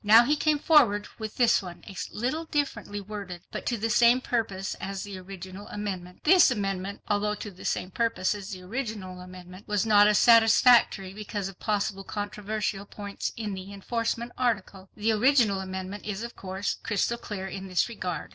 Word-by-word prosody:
Now 220 +3 +8
he 295 - +3
came 300 0 +2
forward 260 -10 +4
with 215 -1 -6
this 240 -3 +4
one, 175 -2 -10
a 195 - -9 0.2
little 260 +9 -2
differently 270 -10 -2
worded, 200 -3 -7
but - - -5
to 240 - 0
the 225 +1 -1
same 235 +2 +5
purpose 210 -6 -2
as 195 -1 -4
the 200 -2 -7
original 190 +1 -9
amendment. 185 -4 -6
This 360 +1 +7
amendment, 195 -4 -2
although 210 0 +1
to 210 - -7
the 185 - -13
same 185 - -1
purpose 230 -3 0
as 200 -1 -7
the 185 -3 -7
original 205 -4 -5
amendment, 180 +1 -12
was 210 0 +1
not 205 -1 +6
as 210 0 +4
satisfactory 230 -4 +5
because 205 -1 -4
of 190 - -14
possible 200 -2 -1
controversial 205 0 -3
points 200 -1 -5
in 215 -3 -3
the 190 +1 -7
enforcement 230 +3 -2
article. 200 -6 -1
The 215 +2 +1
original 225 -3 +3
amendment 190 +1 -5
is 210 +1 -4
of 235 - -7
course 190 +1 -3
crystal 230 +3 0
clear 195 -3 -5
in 195 0 -6
this 185 -2 +1
regard. 185 -7 -5
205 Hz, 180 wpm, -27 LUFS, 190-230 Hz, 0.2 s, Now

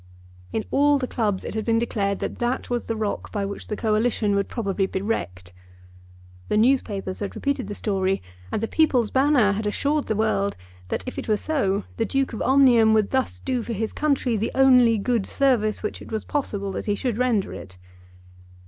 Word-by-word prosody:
In 220 - -2
all 290 +1 +4
the 265 - -2
clubs 215 -6 -1
it - - -5
had 220 0 -2
been 230 0 +2
declared 200 -4 0
that - - -4
that 245 +1 -2
was 240 -1 -2
the 225 - -1
rock 215 -2 -3
by 205 -2 -2
which 200 0 -6
the 210 - -3
Coalition 215 -1 +1
would 200 0 +1
probably 195 -4 -1
be 190 - -3
wrecked. 90 - -4 1.0
The 210 - +2
newspapers 215 -6 +1
had 205 - -4
repeated 280 -3 -2
the 205 - -5
story, 195 -2 0 0.3
and 215 - -2
the - - 0
"People's 255 -8 +2
Banner" 265 -6 +4
had 210 +1 -2
assured 285 +7 0
the 220 - 0
world 200 -2 0 0.3
that - - -3
if 255 - -5
it - - -6
were 215 -1 +2
so 205 -9 0
the 225 - +1
Duke 270 +3 -1
of 220 - -5
Omnium 245 -5 +5
would 215 -2 +2
thus 260 -1 0
do 255 -2 -2
for 230 - -4
his 220 +1 -3
country 275 -5 +1
the 220 +2 -1
only 250 -4 +6
good 225 -1 0
service 235 -7 +1
which 210 - -4
it - - -11
was 220 -1 -3
possible 205 -9 -2
that 190 - -5
he 205 - +1
should 235 +1 -2
render 240 -6 +1
it. 90 -2 -10
220 Hz, 200 wpm, -24 LUFS, 205-255 Hz, 1.0 s, only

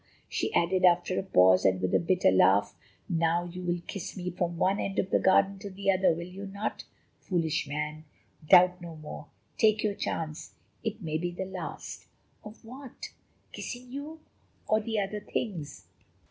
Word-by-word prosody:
she - - -2
added 180 +2 +2
after 180 0 +4
a - - 0
pause, 95 - +5
with 95 -1 +4
a - - -7
little 90 -1 +2
bitter 180 - +3
laugh, 95 +2 +4 0.3
"now 165 +1 +1
you 175 +1 -7
will 175 -1 -1
kiss 195 -1 -6
me 180 0 -3
from 175 -1 -2
one 195 +4 +2
end 195 - -3
of 190 - 0
the - - +4
garden 195 +1 +3
to 200 - -7
the 195 +1 0
other, 190 0 +3
will 170 +1 -5
you 195 +2 -8
not? 200 +2 -4 0.3
Foolish 160 -5 -1
man! 150 +2 -4 0.5
Doubt 180 0 +7
no 170 -2 -8
more; 150 -1 -9 0.3
take 215 -1 +4
your 210 -2 +1
chance, 160 -6 -4 0.3
it 220 -2 -4
may 155 -1 -1
be 175 +1 -1
the 175 +2 -5
last." 185 -3 -7 0.4
"Of 215 +1 -12
what? 260 +2 -9 0.4
Kissing 245 0 -7
you? 295 +4 -7 0.5
Or 215 - +3
the 220 0 -2
other 205 +1 -2
things?" 165 - -5
180 Hz, 175 wpm, -29 LUFS, 165-200 Hz, 0.5 s, Doubt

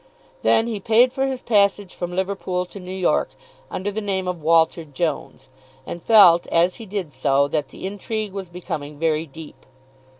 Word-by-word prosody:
Then 225 - +3
he 225 -3 -3
paid 230 +5 +4
for 270 0 0
his 265 -2 -4
passage 200 -3 +2
from 175 0 -5
Liverpool 185 -1 -2
to 200 - -11
New 180 0 -8
York 185 -2 0 0.3
under 200 +2 -3
the 215 +2 -4
name 190 -2 -2
of 180 -2 -3
Walter 165 +1 +3
Jones, 145 -3 -4 0.4
and 170 - -7
felt 185 -6 +6
as 170 +2 +2
he 225 - -10
did 190 -7 -4
so 135 +1 +2
that 150 -2 -1
the - - -10
intrigue 205 +1 -4
was 195 -3 -6
becoming 160 -5 -6
very 160 0 0
deep. 155 +2 -12
180 Hz, 175 wpm, -22 LUFS, 160-205 Hz, 0.4 s, felt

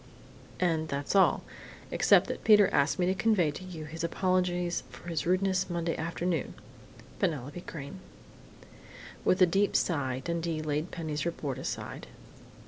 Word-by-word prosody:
"And 165 -3 +1
that's 140 +4 -3
all, 195 - +4 0.5
except - - +5
that - - -5
Peter 210 -3 +6
asked 140 +2 +2
me 180 - +2
to 185 - +2
convey 195 -6 +2
to 165 - -9
you 170 -4 -7
his 165 +2 -6
apologies 180 0 0
for 175 - -10
his 165 -1 -2
rudeness 185 +1 +1
Monday 170 -1 -1
afternoon.... 170 0 -2 0.6
Penelope 145 +2 -2
Crain." 150 +1 -8 1.2
With 185 +1 +4
a - - +9
deep 195 +4 +1
sigh 135 -6 0
Dundee 170 -2 -2
laid 155 +3 -1
Penny's 155 -4 -3
report 145 -6 -3
aside. - - -5
170 Hz, 140 wpm, -29 LUFS, 155-185 Hz, 1.2 s, a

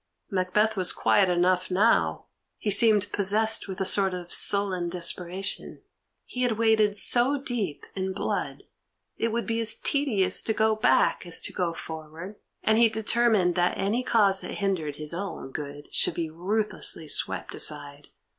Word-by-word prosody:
Macbeth 200 +4 +1
was 185 -3 +1
quiet 195 -2 +2
enough 180 +1 +1
now; 200 +5 +2 0.3
he 210 - -2
seemed 210 -1 +3
possessed 215 +3 0
with 190 -1 -7
a 190 - -1
sort 190 -1 +2
of 175 -1 -7
sullen 190 -4 +2
desperation. 180 +2 -3 0.4
He 250 - -6
had 245 -2 +2
waded 220 -2 +2
so 250 +7 +3
deep 230 - -4
in 190 0 -2
blood, 195 +2 -3 0.5
it 230 - 0
would 230 +1 -2
be 230 -1 -2
as 225 -1 +1
tedious 260 -10 +1
to 220 - -1
go 220 0 +2
back 215 - +2
as 175 - 0
to - - -5
go 170 -2 -2
forward, 160 +6 -8 0.3
and 220 +1 +3
he 235 -1 +6
determined 220 -4 +1
that 175 0 0
any 205 +5 0
cause 205 -6 +3
that - - -7
hindered 180 -8 -2
his 150 +2 -1
own 180 -6 -6
good 145 +1 -7
should - - +2
be 165 -2 -3
ruthlessly 185 -2 -2
swept - - -1
aside. 145 -1 -4
195 Hz, 160 wpm, -26 LUFS, 175-220 Hz, 0.5 s, he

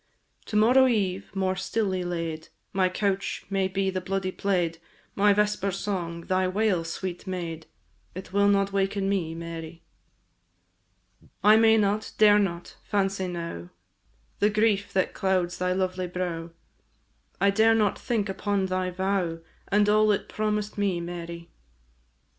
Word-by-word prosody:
To 210 - -6
morrow 250 +5 +6
eve, 195 -5 0
more 190 -1 0
stilly 190 -1 -1
laid, 165 -2 -4 0.3
My 185 -1 +2
couch 195 +1 -2
may 195 -1 +1
be 190 0 -1
the 185 0 -3
bloody 190 0 -2
plaid, 175 -4 -1 0.3
My 205 +1 +4
vesper 210 -1 +1
song, 180 -3 -3
thy 185 +2 0
wail, 190 -2 +1
sweet 180 +3 -5
maid! 170 -3 -5 0.5
It 185 0 -8
will 200 0 +4
not 200 -1 +2
waken 195 0 0
me, 175 -5 -1
Mary! 165 0 -7 1.6
I 210 +1 +7
may 225 0 +5
not, 210 0 0
dare 210 -1 +6
not, 175 -4 -3
fancy 195 -2 -1
now 170 - -6 0.7
The 205 - +4
grief 205 -1 +1
that 190 -1 +1
clouds 185 -2 0
thy 180 0 0
lovely 185 0 -1
brow, 175 -2 -4 0.9
I 200 0 +4
dare 220 +2 +4
not 210 -3 +1
think 220 -4 -1
upon 195 0 -1
thy 185 0 -1
vow, 185 -2 -1 0.3
And 205 +1 +3
all 215 0 +4
it 200 - -1
promised 210 -1 -2
me, 195 -4 +1
Mary. 170 -1 -7
190 Hz, 140 wpm, -26 LUFS, 180-205 Hz, 1.6 s, I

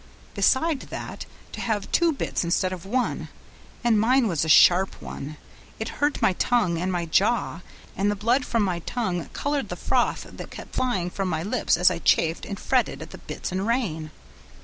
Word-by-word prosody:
Besides 265 +8 +2
that, - - -7 0.2
to - - -6
have 215 -3 -2
two 340 -1 +4
bits 280 - -2
instead 185 +2 +1
of 185 0 -8
one 250 +4 -1 0.6
and 230 -3 +4
mine 250 +3 +4
was 165 -7 0
a 160 - -2
sharp 180 +5 +6
one, 150 +2 -7 0.4
it 220 - -4
hurt 290 0 +1
my 190 - +4
tongue 180 -5 +1
and 185 +2 -1
my 175 -2 -1
jaw, 190 +1 +1 0.3
and 200 +1 +1
the 205 - 0
blood 235 +6 +2
from 230 -3 0
my 180 -3 -1
tongue 180 -3 -3
colored 285 -1 -1
the - - -3
froth - - 0
that - - -9
kept - - -10
flying 190 -9 0
from 195 0 -2
my 160 -2 -1
lips 215 -2 +1
as 180 +1 +5
I 170 - -3
chafed 165 0 +2
and 200 - -5
fretted - - 0
at - - -12
the - - -10
bits - - -6
and 190 +3 -2
rein. 185 -11 -1
195 Hz, 195 wpm, -25 LUFS, 175-240 Hz, 0.6 s, sharp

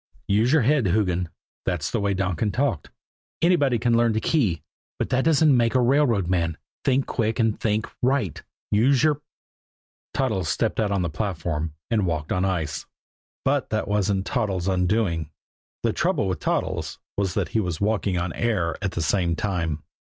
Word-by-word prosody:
"Use 110 +5 +3
your 150 -4 +4
head, 135 -3 +3
Hoogan" 90 -3 +1 0.3
that's 85 -5 -2
the 115 - 0
way 100 -1 0
Donkin 95 +3 0
talked 120 - -1 0.5
"anybody 150 -8 +3
can 120 +1 +2
learn 115 -1 +3
a - - +2
key, 110 - +1 0.3
but - - -2
that 130 0 +2
doesn't 155 -3 +4
make 120 0 +2
a - - +5
railroad 120 -7 +3
man 85 -3 0 0.3
think 135 0 +2
quick 110 -2 -1
and 110 -2 +1
think 110 -1 0
right. 125 - 0 0.3
Use 130 +6 +4
your 150 -2 +2 0.5
" - - -86
Toddles 105 -11 0
stepped 115 +5 0
out 110 -2 +2
on 100 -2 0
the 85 - -1
platform 80 -4 -3 0.2
and 105 -5 +2
walked 80 -3 -2
on 90 +1 +1
ice. 80 -5 -2 0.6
But - - +1
that - - -1
wasn't 100 -1 +1
Toddles' 100 -7 -1
undoing. 90 -4 +1 0.5
The - - +1
trouble - - +1
with 90 -4 -2
Toddles - - -2 0.2
was 100 -2 -1
that - - 0
he 115 - 0
was 90 -6 -2
walking 100 -3 0
on 90 0 -2
air 100 -9 0
at 100 -3 -2
the 85 - -1
same 85 -2 +1
time. 85 -6 -2
100 Hz, 175 wpm, -24 LUFS, 90-120 Hz, 0.6 s, a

